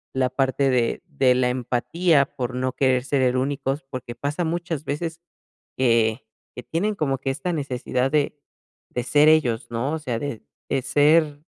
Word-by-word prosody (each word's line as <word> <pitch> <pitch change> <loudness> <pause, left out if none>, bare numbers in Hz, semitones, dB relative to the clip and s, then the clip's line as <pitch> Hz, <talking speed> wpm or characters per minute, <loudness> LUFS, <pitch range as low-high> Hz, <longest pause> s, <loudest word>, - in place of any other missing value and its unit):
la 130 -1 +2
parte 135 +1 +1
de 125 +4 0
de 135 -5 +2
la 125 0 +2
empatía 140 +6 +1
por 125 0 -3
no 130 0 -1
querer 130 -2 +2
ser 140 -1 +1
e 125 0 +2
únicos, 135 +1 -1
porque 130 -3 -6
pasa 145 +6 -2
muchas 165 -2 -3
veces 160 +3 -3 0.6
que 115 -2 +2 0.3
que 125 - -7
tienen 205 +6 -1
como 135 -6 0
que 135 - -3
esta 175 +6 -3
necesidad 130 -3 -1
de 150 -1 +1 0.5
de 125 - -3
ser 145 +4 +5
ellos 135 -8 +2
¿no? 120 +6 -1
o 160 - -2
sea, 125 -7 -3
de 140 -5 -5 0.3
de 135 - +1
ser 145 +2 +3
135 Hz, 170 wpm, -23 LUFS, 125-150 Hz, 0.6 s, ser